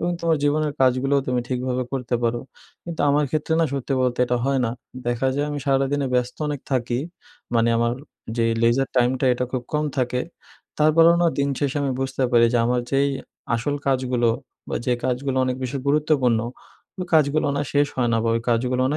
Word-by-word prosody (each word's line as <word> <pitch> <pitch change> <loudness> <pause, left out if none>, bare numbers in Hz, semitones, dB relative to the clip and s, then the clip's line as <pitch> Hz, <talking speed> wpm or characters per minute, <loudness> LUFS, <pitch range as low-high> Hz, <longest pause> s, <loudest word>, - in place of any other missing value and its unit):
এবং 175 - 0
তোমার 165 -1 +2
জীবনের 150 +1 +1
কাজগুলোও 135 +2 +3
তুমি 125 -1 0
ঠিকভাবে 125 0 -1
করতে 125 -2 -2
পারো। 120 0 0 0.4
কিন্তু 170 -2 -5
আমার 145 +1 +3
ক্ষেত্রে 155 +1 0
না 165 - +4
সত্যি 140 0 -2
বলতে 125 -1 0
এটা 125 - +1
হয় 135 0 +1
না, 115 - 0 0.4
দেখা 120 +2 0
যায় 145 +1 0
আমি 145 - -3
সারাদিনে 135 +1 +1
ব্যস্ত 125 0 0
অনেক 145 -2 -3
থাকি, 120 -1 0 0.6
মানে 115 0 +3
আমার 115 0 +1 0.4
যে 115 - +2 0.2
লেজার 120 +3 +3
টাইমটা 125 +2 +2
এটা 125 +1 -1
খুব 130 -2 -1
কম 150 0 +1
থাকে। 125 0 0 0.6
তারপরেও 165 +2 +6
না 170 - +4
দিন 140 0 +2
শেষে 145 0 -1
আমি 135 -2 0
বুঝতে 135 0 -2
পারি 115 -1 +6
যে 120 - +3
আমার 125 +1 +1
যেই 140 +1 +3 0.5
আসল 120 +5 -1
কাজগুলো 130 -3 +1 0.4
বা - - -2
যে 125 - +3
কাজগুলো 130 +1 -1
অনেক 130 0 -1
বেশি 130 +2 -3
গুরুত্বপূর্ণ, 140 -5 +2 0.6
ওই 180 - -3
কাজগুলো 150 -1 +3
না 145 - 0
শেষ 145 0 +3
হয় 125 -2 +1
না 115 - +3
বা - - +1
ওই - - -1
কাজগুলো 125 +2 +1
না - - 0
130 Hz, 195 wpm, -23 LUFS, 125-145 Hz, 0.6 s, তারপরেও